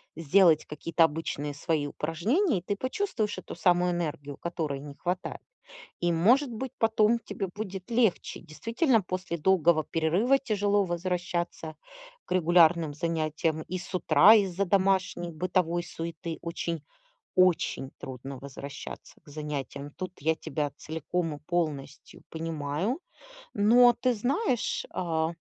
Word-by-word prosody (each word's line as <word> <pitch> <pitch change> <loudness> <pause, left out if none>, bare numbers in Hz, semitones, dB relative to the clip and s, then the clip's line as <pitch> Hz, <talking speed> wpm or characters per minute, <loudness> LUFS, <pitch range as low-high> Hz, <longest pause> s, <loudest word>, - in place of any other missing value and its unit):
сделать 165 +1 +4
какие-то 165 +2 +2
обычные 150 -2 -3
свои 150 -1 -1
упражнения, 195 - 0
ты 200 +3 -2
почувствуешь 255 - -2
эту - - -9
самую 180 -1 +3
энергию, 150 -5 -4
которой 160 -5 -3
не 145 0 -9
хватает. 180 +3 -3 0.6
И, 175 -1 +2
может 245 - +3
быть, 250 +3 -5
потом 220 0 +3
тебе 200 -3 -5
будет 195 +1 -7
легче, 230 -5 +1
действительно, 230 - +1
после 185 -2 -4
долгого 170 -2 +3
перерыва 175 - +2
тяжело 205 -5 +1
возвращаться 175 -2 -3 0.5
к - - -6
регулярным 170 -2 +4
занятиям, 160 -1 -1
и 185 +3 -5
с 185 +1 -10
утра 195 +3 +7
из-за 195 -3 +2
домашней 190 -2 +1
бытовой 175 +1 0
суеты 165 -1 -6
очень 170 -1 -3 0.5
очень 180 -7 +2
трудно 135 +1 -7
возвращаться 140 +1 -9
к - - -22
занятиям. 145 -1 -5
Тут 185 -1 -5
я 160 +3 +2
тебя 150 -2 -3
целиком 160 +1 -3
и - - -13
полностью 150 -4 -4
понимаю, 160 - -2 0.6
но, 240 +4 +6
ты 255 +1 +1
знаешь, 250 - 0
э, 160 -3 0
175 Hz, 125 wpm, -28 LUFS, 155-200 Hz, 0.6 s, утра